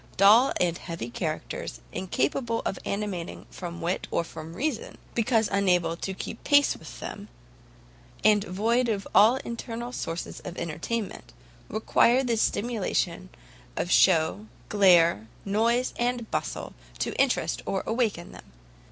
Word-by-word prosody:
Dull 215 +7 +7
and 175 -1 +1
heavy 165 -9 -6
characters, - - -4
incapable 190 - -1
of 190 - -2
animating 200 -4 -4
from 175 -1 -7
wit 175 +3 -2
or - - 0
from 160 0 -9
reason, 270 - -3 0.2
because 225 -2 +2
unable 180 -4 +2
to 190 +2 -5
keep 220 - -7
pace 285 -1 +4
with - - -11
them, - - -7 1.0
and 210 -1 +5
void 230 +6 +1
of 200 -3 -2
all 220 +5 +7
internal 235 +1 -5
sources 165 -8 -5
of 175 - -8
entertainment, 180 - -4 0.4
require 235 +4 +3
the 240 -3 +1
stimulation 200 -6 -1 0.5
of 175 - -1
shew, 185 +4 +4 0.2
glare, 170 - +5 0.2
noise, 230 +5 +1
and 240 -1 -1
bustle, - - -3 0.2
to - - -2
interest - - +1
or 195 - -1
awaken 220 -7 -1
them. - - -14
200 Hz, 130 wpm, -27 LUFS, 170-230 Hz, 1.0 s, Dull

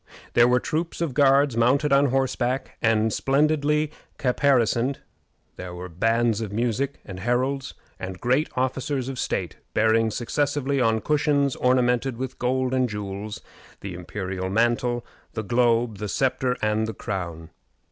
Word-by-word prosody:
There 120 0 +6
were 125 0 +4
troops 165 +6 -3
of 165 -6 -1
guards 140 -1 +4
mounted 135 +5 +3
on 140 +1 +5
horseback 130 -1 -1
and 110 -1 +2
splendidly 150 +2 +2 0.3
caparisoned 130 -1 +2 0.6
there 90 -1 -7
were 90 +1 -7
bands 115 +5 +1
of 105 -3 -4
music, 120 +5 -1
and 95 -2 -8
heralds, 130 +5 -1 0.2
and 95 -1 -6
great 130 +6 +1
officers 130 +1 -1
of 135 - -5
state, - - -2 0.2
bearing 110 +1 +3
successively, 140 +4 -1
on 115 -2 +2
cushions 145 -2 +1
ornamented 125 0 +2
with 130 0 -5
gold 130 +1 0
and 130 -1 +2
jewels, 105 0 -5 0.4
the 100 -2 -6
imperial 95 +1 -4
mantle, 120 +3 +1 0.3
the 110 - -3
globe, 115 -1 +2
the 105 - -4
sceptre, 130 0 0
and 110 +1 +1
the 110 - -5
crown. 85 -7 -5
120 Hz, 140 wpm, -24 LUFS, 110-135 Hz, 0.6 s, There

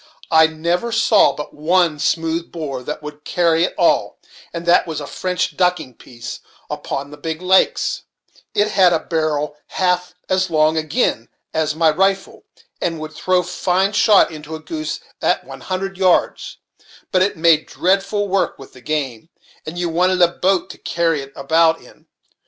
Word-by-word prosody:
I 160 -1 +6
never 170 +8 -2
saw 225 -2 +4
but 150 - -7
one 165 0 +1
smooth 165 +2 -1
bore 145 -6 -5
that 150 +4 -6
would 150 0 -9
carry 170 0 +2
at - - -11
all, - - +2 0.3
and 170 0 -6
that 175 +1 +4
was 160 -2 -4
a 145 - -6
French 180 +4 -2
ducking 180 -7 0
piece, 120 0 -9 0.3
upon 140 +1 -4
the 150 - -10
big 160 +2 -4
lakes; 185 +1 +2 0.5
it 205 +1 +2
had 185 -4 +4
a 165 - +2
barrel 155 -3 -2
half 180 -1 -1
as 185 0 +1
long 155 -1 +3
agin 155 - -1 0.2
as 155 -1 0
my 160 -1 +4
rifle, 195 +4 -1 0.4
and 165 -2 -2
would 155 0 -7
throw 180 +3 +1
fine 180 +2 0
shot 210 -5 +5
into 155 0 -8
a - - -7
goose 310 - -5 0.2
at - - +1
one - - -11
hundred 190 0 -4
yards; 185 -2 +1 0.5
but 185 - +3
it 195 -1 +1
made 160 -1 +3
dreadful 195 +2 0
work 195 0 0
with 135 - -13
the 130 - -15
game, 140 -3 -3 0.4
and 160 +3 -6
you 175 0 -1
wanted 180 +3 +1
a 170 - +5
boat 185 +2 0
to - - -14
carry 165 -3 0
it 135 0 -10
about 160 +3 +2
in. - - -19
170 Hz, 170 wpm, -19 LUFS, 155-185 Hz, 0.5 s, I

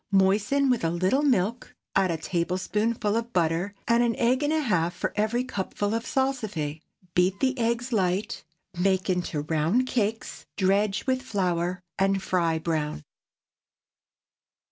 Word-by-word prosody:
Moisten 205 +8 +3
with 245 - 0
a 165 - +2
little 185 - +1
milk; 240 -5 0 0.2
add 195 -1 +3
a 165 - 0
tablespoonful 205 +6 -1
of 230 +1 -2
butter, 175 +3 0
and 235 +1 +4
an 235 -2 +2
egg 250 +3 +2
and 295 +1 +1
a 315 - +2
half 175 - 0
for - - -3
every 220 +4 +1
cupful 205 -3 -3
of 230 0 -2
salsify. 215 - -1 0.3
Beat 185 +2 +2
the 265 0 +1
eggs 235 +2 0
light. 190 0 0 0.3
Make 190 +1 +1
into 175 -4 -1
round 160 +11 +1
cakes, 225 -3 -2
dredge 200 +2 +1
with 260 -1 +1
flour, 180 -6 -1 0.2
and 195 0 +2
fry 170 -4 0
brown. 155 - -2
200 Hz, 145 wpm, -26 LUFS, 180-235 Hz, 0.3 s, and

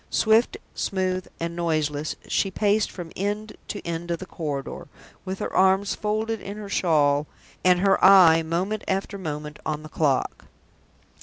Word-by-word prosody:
Swift, 225 - +3 0.2
smooth, 185 -1 -2
and 170 0 -3
noiseless, 155 -3 -1
she 195 - +1
paced 205 +2 +1
from 175 -3 -8
end 210 +2 -3
to 205 - -6
end 170 0 -4
of 170 - 0
the 185 - -8
corridor, 150 -7 -5 0.4
with 190 0 -4
her - - -4
arms 190 +1 +3
folded 215 +1 -2
in 200 +1 -7
her 210 -1 -7
shawl 150 -6 +2 0.4
and 180 -1 +4
her 195 0 +3
eye 180 -4 +8
moment 180 +6 -2
after 195 +1 -2
moment 150 -3 -5
on 155 0 -3
the 155 - -10
clock. 145 -4 0
185 Hz, 155 wpm, -24 LUFS, 160-200 Hz, 0.4 s, eye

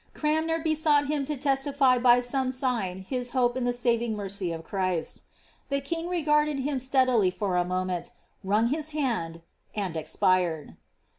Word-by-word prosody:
Cranmer 315 +2 0
besought 310 -2 +2
him 295 -2 0
to 300 -1 -2
testify 270 -1 +2
by 245 0 +5
some 255 +1 0
sign 235 -8 -2
his 250 +4 -3
hope 245 -1 +2
in 255 -1 -1
the 245 - +2
■ving 235 -2 0
mercy 195 -3 -3
of 165 0 -6
ChrisL 185 -4 -2 0.5
The 280 0 0
king 330 +5 -3
regarded 300 -4 +1
him 275 0 -1
steadily 255 -6 +3
for 185 0 -2
a 180 - +3
moment, 185 0 -3 0.3
mmg 210 +4 +2
his 310 +1 -2
hand, 170 - -2 0.3
and 195 -5 -3
expired. 165 0 0
245 Hz, 155 wpm, -27 LUFS, 190-285 Hz, 0.5 s, by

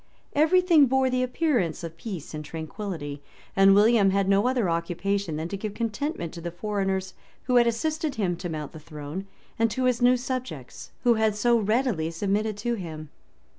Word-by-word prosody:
[] - - -39
Every 315 +5 +4
thing 330 -6 +5
bore 260 0 +2
the 255 0 +1
appearance 250 - 0
of 165 -1 -6
peace 170 -4 -7
and 155 0 -5
tranquillity; 160 -2 -6 0.3
and 195 0 +6
William 210 -1 +5
had 195 0 +1
no 200 +4 +3
other 250 -6 +1
occupation 175 +2 -1
than 160 +2 -3
to 200 - -3
give 205 +1 -5
contentment 230 - -3
to 170 - -8
the 170 - -4
foreigners 190 0 -2 0.3
who 250 - +2
had 240 -1 +5
assisted 310 +6 -1
him 185 -5 0
to 175 - -5
mount 155 -3 -5
the 160 - -10
throne, 155 +5 -7 0.3
and 230 0 +3
to 260 +4 -2
his 250 -1 +2
new 250 +1 +5
subjects, 245 - -5
who 240 -2 +5
had 220 -2 +1
so 235 +3 +3
readily 215 -6 +1
submitted 205 +5 -1
to 240 +3 -1
him. 160 -7 -6
200 Hz, 190 wpm, -26 LUFS, 170-245 Hz, 0.3 s, and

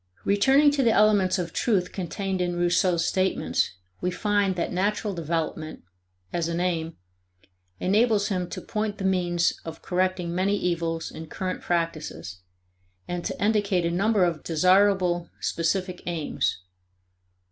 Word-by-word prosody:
Returning 270 +9 +5
to 285 -1 +1
the 235 -3 +4
elements 205 -3 +4
of 175 -3 -4
truth 190 -6 +1
contained 190 +1 -3
in 175 -1 -1
Rousseau's 175 0 +2
statements, 185 - 0 0.3
we 180 - 0
find 200 +1 +1
that 175 - -2
natural 205 +2 0
development, 160 -1 -3 0.5
as 170 -1 0
an 170 0 -2
aim, 165 -2 -1 0.8
enables 210 +1 +2
him 180 -3 -2
to - - -6
point 215 -1 -3
the - - -5
means 175 -2 +2
of 165 -1 -8
correcting 180 -1 0
many 195 +3 +1
evils 165 -3 -2
in 160 - -8
current 185 +3 -4
practices, 155 - -3 0.7
and 175 -1 -3
to - - -4
indicate 205 -4 +1
a 170 - 0
number 200 +3 +2
of 170 -3 0
desirable 180 +1 +3
specific 180 +2 -1
aims. 165 -4 -1
180 Hz, 135 wpm, -26 LUFS, 170-200 Hz, 0.8 s, Returning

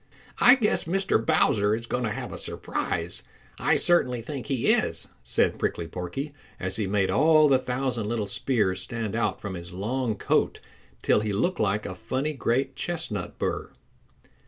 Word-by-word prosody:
"I 250 - +9
guess 230 -6 +1
Mr. 190 +3 +1
Bowser 110 -10 +3
is 115 +1 -5
going 125 +1 -2
to - - 0
have 105 - -5
a - - -6
surprise; - - -3 0.4
I - - +3
certainly 130 -8 +3
think 135 0 -6
he 135 -5 +2
is," - - -1
said - - +1
Prickly 85 - -1
Porky 95 - -5 0.3
as 95 +2 -1
he 105 -3 -1
made 100 -1 +1
all 155 +1 +5
the 135 -2 +4
thousand 125 -3 -2
little 115 -3 -1
spears 100 -2 0
stand 115 -3 -3
out 115 - 0
from 100 -2 -5
his 85 0 -8
long 110 +5 -2
coat - - +1 0.4
till - - +4
he 105 0 -2
looked 175 - 0
like 105 0 +1
a 95 - -4
funny 135 +10 -2
great 135 0 0
chestnut 145 - -3
burr. - - -2
115 Hz, 170 wpm, -26 LUFS, 100-140 Hz, 0.4 s, I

